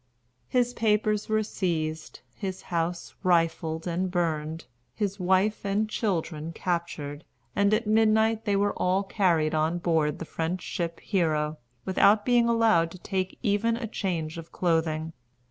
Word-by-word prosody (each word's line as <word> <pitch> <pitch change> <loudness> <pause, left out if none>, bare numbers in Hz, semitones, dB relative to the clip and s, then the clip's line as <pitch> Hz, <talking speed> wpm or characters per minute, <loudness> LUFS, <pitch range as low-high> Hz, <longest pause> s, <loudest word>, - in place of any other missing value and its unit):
His 245 -1 +1
papers 215 -2 +1
were 215 0 +2
seized, 160 -6 -3
his 190 -2 -5
house 170 +1 -2
rifled 165 -3 +1
and 180 +2 -1
burned, 160 -2 -2 0.3
his 200 +2 -2
wife 190 +4 +2
and 200 +2 0
children 165 -7 -2
captured, 170 -5 -3 0.3
and 200 +1 +3
at 215 +2 +2
midnight 220 +1 +3
they 205 -2 +2
were 200 +1 +2
all 185 +2 +1
carried 175 -6 +1
on 160 +2 +1
board 160 -4 +1
the 165 - -6
French 165 +3 -3
ship 170 -1 -4
Hero, 155 -5 0 0.3
without 205 +2 +4
being 240 -1 +4
allowed 225 -8 +4
to 185 - -11
take 190 0 -3
even 225 +1 +1
a 235 - -4
change 170 -7 -3
of 165 0 -11
clothing. 160 -2 0
185 Hz, 145 wpm, -27 LUFS, 165-210 Hz, 0.3 s, without